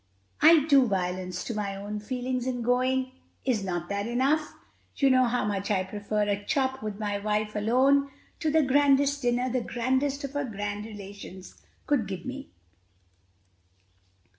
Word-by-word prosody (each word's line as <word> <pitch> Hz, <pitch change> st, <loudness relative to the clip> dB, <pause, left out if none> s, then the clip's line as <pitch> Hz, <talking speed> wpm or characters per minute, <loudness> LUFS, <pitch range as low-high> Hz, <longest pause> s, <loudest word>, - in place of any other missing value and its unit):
I 315 Hz, -2 st, +7 dB
do 275 Hz, -5 st, +5 dB
violence 180 Hz, -2 st, -2 dB
to 235 Hz, -, -4 dB
my 205 Hz, -2 st, -3 dB
own 205 Hz, +2 st, -5 dB
feelings 250 Hz, +2 st, -3 dB
in 245 Hz, -2 st, -2 dB
going: 255 Hz, +2 st, +1 dB, 0.3 s
is 240 Hz, -6 st, +1 dB
not 175 Hz, -3 st, -3 dB
that 200 Hz, +1 st, -2 dB
enough? 275 Hz, +6 st, 0 dB, 0.4 s
You 275 Hz, -1 st, +3 dB
know 255 Hz, 0 st, +5 dB
how 245 Hz, -2 st, 0 dB
much 200 Hz, -1 st, -2 dB
I 195 Hz, -3 st, +2 dB
prefer 210 Hz, +2 st, -2 dB
a 205 Hz, 0 st, -1 dB
chop 265 Hz, +2 st, 0 dB
with 215 Hz, -1 st, -5 dB
my 205 Hz, -1 st, -2 dB
wife 210 Hz, +1 st, -1 dB
alone 265 Hz, +6 st, +3 dB, 0.3 s
to 315 Hz, -, 0 dB
the 315 Hz, +1 st, +4 dB
grandest 285 Hz, +1 st, +3 dB
dinner 245 Hz, 0 st, +1 dB
the 255 Hz, 0 st, 0 dB
grandest 260 Hz, +5 st, -1 dB
of 275 Hz, -, -4 dB
her 285 Hz, 0 st, -2 dB
grand 205 Hz, -2 st, -4 dB
relations 200 Hz, -3 st, -10 dB, 0.2 s
could 275 Hz, -9 st, +1 dB
give 190 Hz, -2 st, -6 dB
me." 270 Hz, +2 st, -6 dB
240 Hz, 160 wpm, -27 LUFS, 205-265 Hz, 0.4 s, I